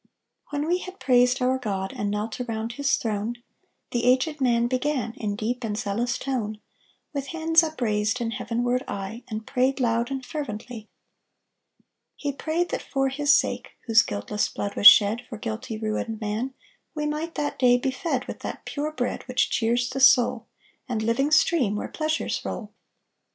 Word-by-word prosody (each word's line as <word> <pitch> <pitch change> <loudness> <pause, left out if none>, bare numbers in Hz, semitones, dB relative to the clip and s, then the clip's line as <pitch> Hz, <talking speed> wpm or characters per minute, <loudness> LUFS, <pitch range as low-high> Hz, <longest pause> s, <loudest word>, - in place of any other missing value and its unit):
When 290 +1 -2
we 355 +2 +2
had 370 +1 -9
praised 250 0 +3
our 260 +1 +2
God, 195 -5 -3
And 205 - -2
knelt 210 +3 -3
around 225 -1 -3
His 280 +1 +1
throne, 220 +1 -2 0.6
The 240 0 0
aged 260 +4 +2
man 235 -2 +3
began 255 -2 -1
In 215 -6 -3
deep 240 +4 -3
and 210 -2 -2
zealous 235 +4 -1
tone, 220 -6 -3 0.5
With 280 -1 -3
hands 325 +1 +3
upraised 235 -8 0
And 230 -1 -2
heavenward 245 +1 -1
eye, 200 +4 -5
And 220 0 -5
prayed 260 +1 +1
loud 235 -1 +1
And 265 -2 -4
fervently: 235 -6 -6 1.3
He 285 - -3
prayed 320 +5 -1
that - - -2
for 270 -1 0
His 290 +2 +2
sake, - - +1
Whose 225 -2 +6
guiltless 100 - -2
blood 200 - -4
was 205 - +8
shed 215 +3 +8
For 225 - -6
guilty 225 +1 -5
ruined 220 0 -3
man, 225 +5 -3 0.4
We 300 -1 -2
might 305 +3 -3
that 295 -1 -2
day 245 -1 +5
be 265 +2 -1
fed 265 -2 -2
With - - -7
that - - -6
pure 300 +1 -3
bread 250 -5 -2
Which 255 0 +1
cheers 240 +1 +1
the 255 +2 -4
soul, 250 -3 +5 0.4
And 220 -3 -1
living 235 +6 +1
stream, 305 -8 +3
Where 210 - -3
pleasures 310 0 -2
roll. - - -5
245 Hz, 170 wpm, -25 LUFS, 220-275 Hz, 1.3 s, was